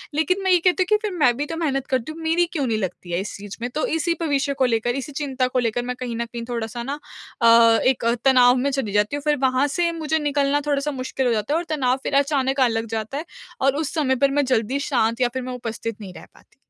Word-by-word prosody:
लेकिन 365 +6 +1
मैं 380 - +2
ये 360 - +5
कहती 365 +2 +2
हूँ 360 - -11
कि 425 - +5
फिर 405 - -4
मैं 245 -5 +4
भी 290 - -1
तो 325 - -5
मेहनत 275 -5 -1
करती 260 +3 -1
हूँ, 325 - -9
मेरी 330 +2 +2
क्यों 325 -5 -3
नहीं 225 - 0
लगती 185 -3 -5
है 170 - 0
इस 195 - -6
चीज़ 200 0 -9
में? 245 - -2
तो 300 +5 -2
इसी 325 +1 0
पे 335 - -1
विषय 280 -1 0
को 270 -1 +1
लेकर, 230 -1 0
इसी 275 +1 -5
चिंता 270 -3 -1
को 255 0 0
लेकर 240 0 0
मैं 250 - -3
कहीं 245 -2 -4
न 235 +1 -2
कहीं 235 -1 -5
थोड़ा-सा 235 0 -4
ना 280 +4 -4 0.4
अ, 230 0 +6
एक 255 -3 +2 0.2
तनाव 250 -2 +6
में - - +3
चली 265 -7 -2
जाती 210 +6 +1
हूँ 290 - -5
फिर 295 -1 +3
वहाँ 260 +3 +1
से 340 -1 +2
मुझे 320 -1 -1
निकलना 290 -1 +1
थोड़ा-सा 290 +1 0
मुश्किल 260 +1 -2
हो 240 - +2
जाता 215 +6 -1
है - - +3
और 340 - -2
तनाव 255 -2 +1
फिर - - -3
अचानक 275 -1 0
आने 245 -3 +3
लग 225 0 -2
जाता 220 +6 -4
है 315 - -4 0.4
और 275 +1 +3
उस 295 - -5
समय 280 -5 +1
पर 275 - +1
मैं 285 - +2
जल्दी 255 +1 0
शांत 230 -3 +1
या 250 - +4
फिर 260 - -3
मैं 255 - -5
उपस्थित 230 -2 -5
नहीं 190 -3 -8
रह - - -11
पाती। - - -24
265 Hz, 275 wpm, -22 LUFS, 235-295 Hz, 0.4 s, अ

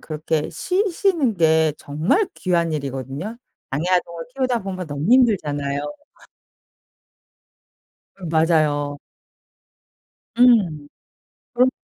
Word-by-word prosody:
그렇게 155 0 -2
쉬시는 365 - 0
게 160 -2 +3
정말 160 - 0
귀한 170 -3 0
일이거든요. 140 - -5 0.4
장애 145 +4 -1
아동을 170 -2 0
키우다 255 -5 0
보면 185 -2 -5
너무 145 +7 -3
힘들잖아요. 145 - +2 2.4
음 175 -4 -6
맞아요. 155 -3 +1 1.4
음. 190 -12 +4 0.7
그럼요. 250 +1 +4
165 Hz, 210 characters per minute, -21 LUFS, 150-235 Hz, 2.4 s, 음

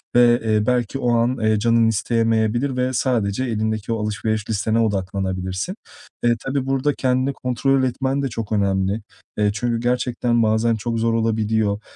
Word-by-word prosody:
Ve, 120 0 +5
eee, 110 -1 +1
belki 125 +1 0
o 120 -2 +1
an, 120 +2 +1
eee, 110 -1 +2
canın 115 +1 +3
isteyemeyebilir 115 +3 +1
ve 125 +1 0
sadece 120 -3 0
elindeki 110 -2 -2
o 110 -2 -2
alışveriş 105 +1 -2
listene 110 +1 0
odaklanabilirsin. 95 - -2 0.5
Eee, 120 0 +3
tabii, 135 0 -1
burada 135 +2 +1
kendini 130 +1 0
kontrol 130 +1 0
etmen 130 +2 -1
de 140 - 0
çok 110 -2 -5
önemli. 100 0 0 0.4
Eee, 105 -1 +2
çünkü 115 +2 -1
gerçekten 120 -1 0
bazen 110 +1 +2
çok 115 +1 -3
zor 115 0 +1
olabiliyor. 110 -2 0
115 Hz, 155 wpm, -21 LUFS, 110-125 Hz, 0.5 s, Ve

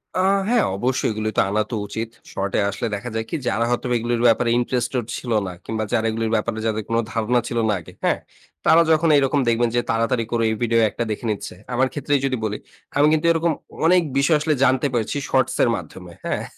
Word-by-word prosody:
আ - - 0 0.3
হ্যাঁ। 240 -2 +3
অবশ্যই 125 +4 0
এগুলি 110 0 -2
তো - - +6
আনা 105 +2 +1
তো - - -1
উচিত। 110 +2 -4 0.2
শর্ট 100 0 -2
এ - - +3
আসলে 100 +3 -3
দেখা 120 +5 -6
যায় 110 0 -1
কি? - - -3
যারা 110 +4 +1
হয়তো 120 +1 -1
এগুলির 120 0 -1
ব্যাপারে 115 +1 +3
ইন্টারেস্টেড 125 0 -1
ছিল 120 - -6 0.2
না 90 - -5
কিংবা 110 -1 -2
যারা 115 -2 +2
এগুলির 115 0 -2
ব্যাপারে 110 +1 -1
যাদের 110 -1 -1
কোনো 115 0 +2
ধারণা 115 +2 +1
ছিল 120 - -3
না 105 - +3
আগে, 80 - -14
হ্যাঁ? - - +2 0.5
তারা 165 - +6
যখন 160 +1 +3
এইরকম 140 +1 +2
দেখবেন 115 +1 +2
যে 120 - +3
তাড়াতাড়ি 115 +1 0
করে 115 -1 +1
এই 110 - 0
ভিডিও 115 0 +2
একটা 120 - -3
দেখে 105 - -4
নিচ্ছে। 105 - -5 0.2
আমার 130 +2 +2
ক্ষেত্রেই 145 0 0
যদি 130 -2 0
বলি। 105 0 -2 0.4
আমি 145 - +5
কিন্তু 155 +1 +1
এরকম 165 0 +1 0.3
অনেক 180 +1 +5 0.2
বিষয় 140 +3 +4
আসলে 155 +1 +1
জানতে 130 +1 +3
পারছি 120 +3 -1
শর্টস 130 -1 +2
এর - - +3
মাধ্যমে, 90 -5 -9
হ্যাঁ? - - -1
120 Hz, 215 wpm, -22 LUFS, 110-130 Hz, 0.5 s, তো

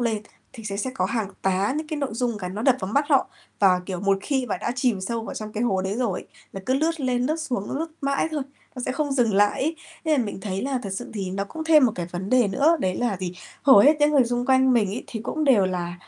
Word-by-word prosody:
lên, 225 -3 0 0.3
thì 230 -4 -11
sẽ 200 -2 -3
sẽ 235 +6 -2
có - - 0
hàng 225 -5 -2
tá 195 +6 +1
những 310 +1 -3
cái 310 - -4
nội 280 -2 -2
dung 235 -1 -1
cái 180 -2 -5
nó 205 +4 -5
đập 255 0 +4
vào 190 +2 -4
mắt 280 +4 +3
họ, 275 -4 +3 0.3
và, 185 -3 +5
kiểu, 185 -3 -4
một 195 0 +2
khi 265 +3 -1
mà 205 - -2
đã 215 +5 -3
chìm 245 -6 +1
sâu 230 +4 -3
vào - - -6
trong 215 0 -6
cái 220 +2 -2
hố 190 -6 +1
đấy 190 +1 -2
rồi 235 -7 -2 0.3
là 195 - -6
cứ 260 - +2
lướt 320 +3 0
lên 250 -2 0
lướt 310 +3 0
xuống, 255 -11 -3
lướt 315 +4 -2
mãi 275 +2 0
thôi, 305 -3 -2 0.3
nó 250 - -5
sẽ - - 0
không 285 +1 -1
dừng 240 -6 +2
lại 205 +5 +3
ấy. 320 +4 -1 0.3
Nên 300 -6 +2
mình 205 -2 -6
thấy 190 -1 -3
là 265 -1 -1
thực 200 - -5
sự 220 +6 -5
thì 195 -3 -3
nó 195 +1 -2
cũng 315 +10 -7
thêm 310 -3 +6
một 225 - -1
cái 175 -1 -4
vấn 185 +3 -5
đề 250 -4 +4
nữa, 290 +11 +3
đấy 185 -1 0
là 240 -5 0
gì? 180 -1 -4 0.3
Hầu 270 -7 +8
hết 290 +9 +6
những 295 0 +5
người 280 -4 +4
xung 245 +1 -2
quanh 260 0 +4
mình 225 -5 +3
ấy, 205 +6 -5
thì 225 - -6
cũng 310 +6 -2
đều 235 -9 +5
là 175 -1 -3
240 Hz, 285 wpm, -24 LUFS, 195-275 Hz, 0.3 s, Hầu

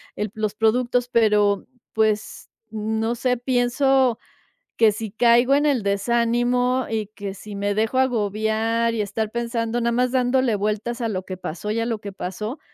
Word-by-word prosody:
el 210 -1 -3
los 215 -1 -2
productos, 245 +3 +1
pero, 210 -4 +2 0.3
pues, 215 -1 -1 0.2
no 220 +1 -1
sé, 250 +1 0
pienso 255 0 +2 0.6
que 225 -2 +5
si 215 0 -6
caigo 240 +3 +4
en 290 +1 +2
el 275 -6 +2
desánimo 240 +4 +1
y 220 -2 -1
que 200 -2 -6
si 205 +1 -10
me 200 0 -1
dejo 220 +4 0
agobiar 225 -1 0
y 220 - 0
estar 215 +1 -3
pensando, 235 0 -2
nada 235 0 +1
más 250 +1 +1
dándole 255 -3 +2
vueltas 215 +4 -2
a 230 - 0
lo 190 -4 -3
que 185 - -6
pasó 185 +3 -5
y 220 - -1
a 230 - 0
lo 225 -3 -2
que 200 - -7
pasó 210 - -5
225 Hz, 170 wpm, -22 LUFS, 210-245 Hz, 0.6 s, que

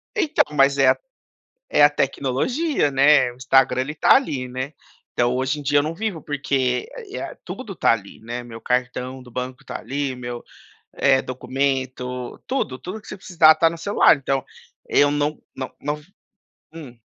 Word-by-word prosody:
Então, 320 -7 +2
mas 140 0 +4
é 135 -1 +5
a - - +3 0.7
é - - +3
a 145 - +8
tecnologia, 145 - 0
né. 140 -1 +5
O - - -15
Instagram 130 0 +3
ele 150 +3 -4
tá - - +5
ali, 140 - 0
né. 130 +4 -5 0.4
Então, 120 0 +1
hoje 130 +3 -1
em - - -8
dia, 145 +1 +3
eu - - +1
não 155 +2 -3
vivo, 200 -4 -3
porque 135 -3 -1 0.2
é - - -5
a - - -6
tudo 220 -7 -7
tá - - +3
ali, 100 -3 -7
né. 120 +2 -6
Meu 115 -1 -10
cartão 125 +1 -2
do 125 - -15
banco 125 +1 -6
tá - - -6
ali, 140 -1 -3
meu, 120 -1 -6 0.5
eh, 135 -1 +3
documento, 130 -1 -3
tudo. 135 - -2
Tudo 190 +9 -7
que - - -18
você - - -6
precisar, 165 -4 +5
está 165 +1 +3
no 170 - -6
celular. 200 -1 +4
Então, 135 -1 -1 0.5
eu 145 0 +4
não 145 +1 -1 0.2
não 130 -1 -5
não 150 +1 -3 0.7
hum. 140 -7 -10
135 Hz, 180 wpm, -22 LUFS, 125-150 Hz, 0.7 s, a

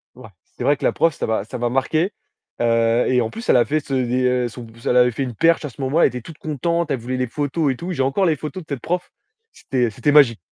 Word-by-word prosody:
Ouais, 125 -4 -12 0.3
c'est - - -4
vrai 145 - +3
que - - -11
la - - +4
prof, 165 -2 +2
ça - - -3
m'a 110 -3 0
ça 115 - -7
m'a 120 0 -1
marqué, 155 - 0 0.5
heu, 115 0 +2
et 125 -1 +3
en 110 - -1
plus, 230 +2 -8
elle - - +6
a 120 - +4
fait 155 +1 0
ce 140 -2 -7
et 125 0 +1
son 120 +1 -9
p 110 - -15
elle 125 - +2
avait 125 0 +5
fait 135 +4 -3
une 125 -3 -5
perche, 165 +1 +3
à - - -4
ce 130 - -19
moment-là. 140 +6 +2
Elle - - +6
était 125 -1 -6
toute 155 +5 -12
contente, 165 +2 -1
elle 130 - 0
voulait 130 +2 -4
les 125 -1 -1
photos, 145 +3 -1
et - - -3
tout. 175 +8 -6
J'ai 135 -6 0
encore 135 +9 +1
les 160 -3 +2
photos 160 +5 -6
de - - -28
cette 130 - -5
prof, 180 +1 -3 0.4
c'était 125 - -1
c'était 120 +7 0
magique! 140 -8 +6
130 Hz, 285 wpm, -21 LUFS, 120-155 Hz, 0.5 s, elle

